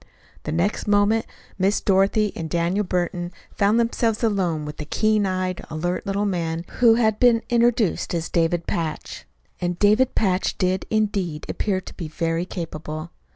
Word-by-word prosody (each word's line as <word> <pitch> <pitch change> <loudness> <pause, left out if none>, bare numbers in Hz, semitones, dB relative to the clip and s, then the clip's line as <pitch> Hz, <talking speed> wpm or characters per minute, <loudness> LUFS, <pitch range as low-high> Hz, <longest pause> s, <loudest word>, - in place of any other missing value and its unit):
The 150 - -2
next 175 +8 0
moment 205 +2 +3 0.3
Miss 195 +2 +2
Dorothy 200 +2 +2
and 160 -1 -5
Daniel 170 +5 0
Burton 175 -1 -2 0.2
found 205 +3 +3
themselves 230 -1 0
alone 180 -8 0
with 150 0 -7
the 150 - -5
keen 215 +4 +1
eyed, 185 -1 -2
alert 175 +5 -3
little 200 +1 0
man 170 -3 -2
who 235 -2 +6
had 220 -2 +2
been 235 -2 +4
introduced 235 -7 +2
as 165 0 -2
David 170 0 0
Patch. 160 -2 -4 0.3
And 175 -1 -2
David 215 +6 +3
Patch 190 -3 +1
did, 185 -1 0
indeed, 200 -8 -1
appear 190 -3 -1
to - - -11
be 170 - -6
very 165 +2 -1
capable. 155 -2 -6
185 Hz, 155 wpm, -23 LUFS, 170-210 Hz, 0.3 s, who